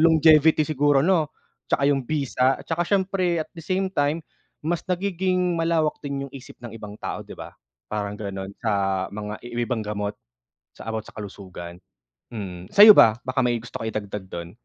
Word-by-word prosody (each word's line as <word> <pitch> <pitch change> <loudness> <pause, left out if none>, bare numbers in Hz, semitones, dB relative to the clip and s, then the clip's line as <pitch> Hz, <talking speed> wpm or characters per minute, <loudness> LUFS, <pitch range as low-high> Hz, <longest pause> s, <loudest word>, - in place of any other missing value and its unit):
longevity 160 -1 +6
siguro 145 -2 +2
no? 165 -4 +3 0.4
Tsaka 140 - +1
yung 140 -1 +2
bisa 135 -3 +1
tsaka 165 +1 -2
siyempre 185 -3 +1
at - - -29
the 170 - -10
same 190 0 0
time 145 +1 0 0.4
mas 170 +1 0
nagiging 185 -1 0
malawak 165 -2 +1
din 140 -1 -4
yung - - -28
isip 135 -2 -11
ng 120 - -7
ibang 105 -2 -9
tao, - - -5
'di - - -11
ba? - - -9 0.4
Parang 105 -1 -2
ganon 100 -1 -6
sa 95 -3 +1
mga 105 0 -5
i 120 - -9
yung 120 0 -1
ibang 120 -4 -1
gamot 105 0 -3 0.6
sa - - -12
about 110 -1 -3
sa - - -14
kalusugan, 95 -4 -9 0.6
mm. 95 -4 -6
Sa'yo 210 +2 +10
ba? 110 - +7
Baka 130 +1 -2
may 125 -2 +2
gusto 115 +2 -6
ka 110 - -4
idagdag 105 -2 -5
dun? 85 -2 -7
130 Hz, 180 wpm, -24 LUFS, 105-165 Hz, 0.6 s, Sa'yo